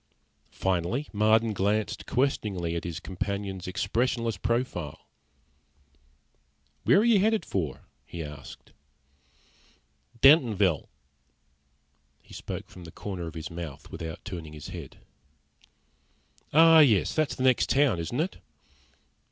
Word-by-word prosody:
Finally 95 - -1
Marden 110 +1 +3
glanced 105 +2 -1
questioningly 100 -10 -1
at 85 - -4
his 85 0 -4
companion's 95 0 -4
expressionless 115 +4 -1
profile. 95 - -3 1.8
"Where - - +6
are - - +1
you 230 -4 +5
headed 220 +2 +2
for?" 80 -8 -3 0.3
he 85 -1 -6
asked. 75 -2 -11 1.5
"Dentonville." 110 - +4 1.3
He - - -18
spoke - - -6
from 90 -2 -12
the 80 - -10
corner 90 -3 -6
of 80 - -9
his 80 -1 -6
mouth, 80 -4 -8
without 80 +1 -7
turning 85 -7 -7
his 75 -2 -9
head. - - -9 1.5
"Oh, 165 +1 +7
yes. 115 - +4
That's 155 -2 0
the 130 - -3
next 130 -2 +3
town, 135 -7 +3
isn't 100 - -3
it?" 175 +5 -1
100 Hz, 115 wpm, -27 LUFS, 85-125 Hz, 1.8 s, Oh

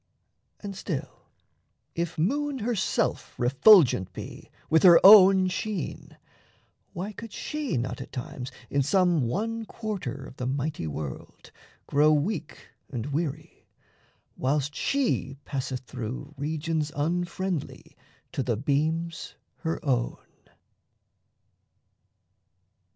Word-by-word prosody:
And 200 -2 -6
still, 175 -6 -6 0.7
if 170 +1 -3
moon 280 - 0
herself 230 -3 -1
refulgent 130 - +5
be - - -9 0.2
With 160 - +4
her 175 -3 +8
own 190 -2 +9
sheen, 185 -1 -4 0.8
why 190 +5 -4
could 230 +1 -9
she 300 - -3
not 125 +2 -3
at - - -9
times 125 0 -6 0.2
In 140 - +2
some 170 -2 +2
one 225 - -2
quarter 210 - -5
of - - -12
the 125 - -3
mighty 135 - -2
world 75 -3 -7 0.3
Grow 150 +2 +4
weak 160 +2 -2 0.2
and 130 +2 -4
weary, 155 +1 -4 0.7
whilst 145 +2 0
she 235 - -1
passeth 130 -2 -3
through 130 +4 -7
Regions 155 +1 -2
unfriendly 175 +2 -3 0.4
to - - -2
the 120 -4 -1
beams 155 +6 -1 0.2
her 165 0 -3
own? 125 -4 0
155 Hz, 105 wpm, -27 LUFS, 135-190 Hz, 0.8 s, own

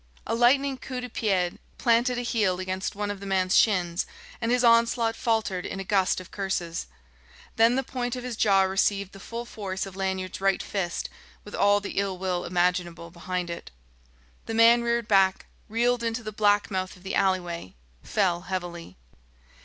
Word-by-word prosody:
A - - -2
lightning 260 +3 +3
coup 255 -1 -5
de 250 0 -6
pied 190 -6 0 0.2
planted 240 +1 +2
a 245 - -2
heel 210 -7 +1
against 185 +1 -3
one 205 0 -2
of 205 - -6
the 200 - -8
man's 190 -1 +1
shins, 180 -5 +2 0.3
and 230 0 0
his 250 0 +2
onslaught 230 -1 +4
faltered 220 -6 0
in 195 - -5
a - - -3
gust 190 -1 +2
of 185 - -12
curses. 190 -4 -3 0.7
Then 230 +2 +5
the 265 - +1
point 245 -1 -3
of 250 - -6
his 250 -2 -4
jaw 195 -3 +4
received 195 +1 +1
the 195 - -12
full 235 +4 -6
force 195 -4 -4
of 195 -1 -10
Lanyard's 190 -1 -3
right 195 -1 +2
fist 180 -4 -3 0.4
with 205 - -12
all 205 0 +4
the 200 -1 -3
ill 195 -2 -1
will 180 -1 -2
imaginable 175 -1 0
behind 180 0 -4
it. 170 - -7 0.8
The 225 - -3
man 230 +1 +6
reared 235 -1 0
back, 195 -2 +3 0.2
reeled 240 +2 +1
into 230 0 -2
the 215 - -5
black 205 0 +2
mouth 185 0 -2
of 180 - -19
the 195 - -5
alleyway, 175 - 0 0.3
fell 180 -4 0
heavily. 175 - -5
195 Hz, 180 wpm, -26 LUFS, 185-230 Hz, 0.8 s, man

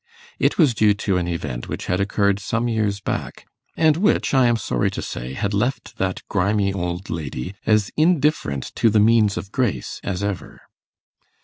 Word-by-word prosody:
It - - +2
was 150 -8 +4
due 105 -2 +3
to 100 -2 0
an 90 -1 -1
event 75 -8 -4
which - - -4
had 90 - 0
occurred 100 0 +1
some 115 +4 -1
years 105 -3 0
back, - - -4 0.3
and 160 -1 +4
which, 200 -3 +2
I 130 -2 +5
am 120 -1 +2
sorry 60 - 0
to - - -5
say, 60 +2 -5
had 100 +8 -2
left 120 +7 -2
that 95 -1 -2
grimy 100 0 +1
old 90 0 -4
lady 75 0 -4
as 110 -2 +3
indifferent 150 - +1
to 115 - +4
the 105 0 +3
means 110 -1 +4
of 100 - -6
grace 105 - -1
as 100 0 -3
ever. 100 -3 -4
100 Hz, 180 wpm, -22 LUFS, 90-115 Hz, 0.3 s, I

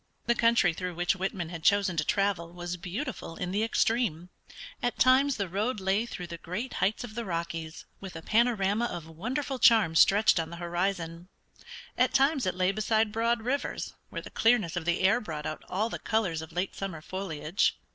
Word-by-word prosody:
The 235 - +3
country 230 -7 +3
through 180 +1 -5
which 175 +2 +1
Whitman 190 -3 -3
had 165 -2 -7
chosen 200 +1 +3
to 155 - +2
travel 190 -2 0
was 175 0 -5
beautiful 180 - -5
in 180 +1 -4
the 205 +3 0
extreme; 225 -6 0 0.5
at 245 - -1
times 260 +2 +5
the 200 -2 -1
road 210 +6 -1
lay 195 +4 +1
through 180 -6 -6
the 170 -1 -8
great 210 +11 -5
heights 205 +5 +1
of 235 -3 -8
the 235 +1 -3
Rockies, 165 -4 -4
with 190 -3 -9
a 165 - -7
panorama 220 -1 +2
of 175 -8 -5
wonderful 250 - -4
charm 220 -10 +5
stretched 200 +2 +5
on 160 -1 -2
the 170 - -7
horizon; 175 0 -3 0.7
at - - +3
times 275 -3 +3
it 180 - 0
lay 185 +1 +2
beside 215 +1 +1
broad 230 +1 0
rivers 270 +4 -2 0.2
where - - -6
the - - -10
clearness 225 -8 +2
of 175 -2 -3
the 175 0 +1
air 200 +6 +4
brought 155 -6 -6
out 155 - -5
all 205 +4 0
the - - -5
colors 195 -8 0
of 160 - -9
late 180 +3 -2
summer 185 -5 -5
foliage. 175 -2 -1
195 Hz, 195 wpm, -29 LUFS, 170-225 Hz, 0.7 s, times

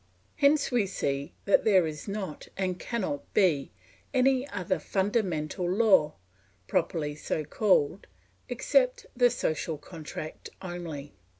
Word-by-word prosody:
Hence 285 0 +4
we 235 -5 +2
see 140 -6 -2
that 200 - +4
there 190 -5 +5
is 150 +1 -6
not, 200 -6 -5
and 185 -2 -1
cannot 190 -12 -3
be, 160 -9 +3 0.4
any 260 +1 +3
other 185 -3 -1
fundamental 185 -4 -1
law, 190 -7 +4 0.5
properly 150 -2 0
so 155 +1 -3
called, 190 0 +2 0.4
except - - +2
the 245 0 +5
social 160 -8 -2
contract 155 0 -8
only. 170 -6 -6
185 Hz, 115 wpm, -28 LUFS, 155-220 Hz, 0.5 s, there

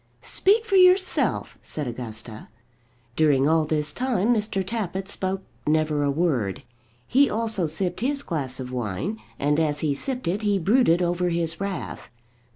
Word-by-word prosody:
"Speak 430 +4 +3
for 395 -3 +2
yourself," 370 0 +3
said 150 - -4
Augusta. 115 -2 -6 0.7
During 145 -3 +3
all 160 0 +3
this 150 -1 0
time 245 -3 +1
Mr. 210 -3 -1
Tappitt 195 -3 -3
spoke 190 -1 -2 0.2
never 155 -1 +1
a 145 - +1
word. 140 - 0 0.4
He 275 +3 +4
also 220 -6 0
sipped 175 +4 -2
his 280 +4 0
glass 135 -7 -3
of 125 -1 -6
wine, 125 - -3 0.2
and 145 +2 +1
as 150 -2 0
he 150 -3 +1
sipped 250 - -3
it 190 +5 0
he 205 -2 +2
brooded 190 -2 +3
over 175 +1 0
his 165 0 -2
wrath. 195 -2 -5
175 Hz, 155 wpm, -24 LUFS, 150-215 Hz, 0.7 s, He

